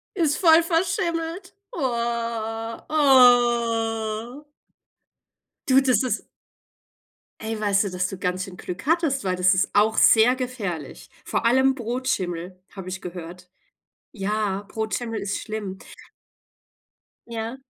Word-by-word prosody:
Ist 320 -6 +1
voll 330 -2 +6
verschimmelt. 335 +1 -2 0.2
Oha. 235 - -3
Oh. 240 -3 +3 1.2
Du, 265 0 +6
das 255 -5 +2
ist 255 - -2 1.1
Ey, 220 0 -4
weißt 205 -1 +2
du, 200 - -3
dass 180 0 -1
du 195 - -6
ganz 180 0 -2
schön 190 -3 -11
Glück 180 +8 -7
hattest, 315 - +1
weil 185 -1 0
das 180 +1 +4
ist 185 - +1
auch 215 +2 +3
sehr 235 +3 +6
gefährlich. 210 - -5
Vor - - -2
allem 260 +3 +4
Brotschimmel 190 -8 -3
habe 190 -2 -9
ich 190 +1 -5
gehört. 180 0 -9 0.6
Ja, 205 -2 -2
Brotschimmel 220 +1 -3
ist 200 0 -3
schlimm. 210 -3 -5 1.5
Ja. 230 +2 -5
225 Hz, 115 wpm, -24 LUFS, 195-260 Hz, 1.5 s, voll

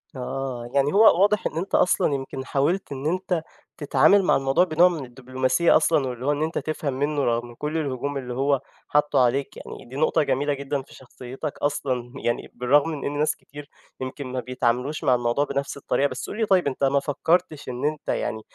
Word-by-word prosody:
آه، 125 -1 -4
يعني 140 +1 +2
هو 200 -3 +6
واضح 205 0 +3
إن - - -7
أنت 185 +4 -1
أصلًا 180 - +3
يمكن 135 -1 -4
حاولت 165 +9 0
إن 135 0 -5
أنت 180 -1 -1 0.3
تتعامل 195 +6 +4
مع - - +3
الموضوع 135 +5 +3
بنوع 175 0 +4
من 160 -6 -4
الدبلوماسيّة 130 +6 +1
أصلًا، 155 -3 +2
واللي 125 0 -5
هو 145 - +3
إن 145 +1 0
أنت 160 +1 -2
تفهم 155 -3 -2
منُّه 145 +2 -1
رغم 120 0 -1
كُلّ 150 +6 -3
الهجوم 140 -1 -2
اللي 125 -2 -5
هو 135 +1 +1 0.3
حطّه 150 -1 +2
عليك 130 +2 +1
يعني، - - -10
دي 130 - -10
نقطة 155 +1 +2
جميلة 145 +2 0
جدًا 140 0 -3
في 135 - -17
شخصيتك 130 +3 -8
أصلًا، 130 -4 -2
يعني 120 - -2
بالرغم 140 +5 +3
من 150 -3 -5
إن 145 +1 -2
ناس 150 - +1
كتير 145 0 -12 0.3
يمكن 130 +1 -5
ما 130 0 -3
بيتعاملوش 125 +3 -1
مع 125 - +4
الموضوع 120 +3 0
بنَفْس 140 0 -3
الطريقة، 140 0 +1
بس 130 -2 -6
قُل 210 - -6
لي 225 - +1
طيب 190 -6 +3
أنت 140 0 -3
ما 140 +1 +3
فكرتش 155 +1 0
إن 125 +3 -4
أنت 150 0 -2
يعني 110 - -2
140 Hz, 200 wpm, -24 LUFS, 130-155 Hz, 0.3 s, هو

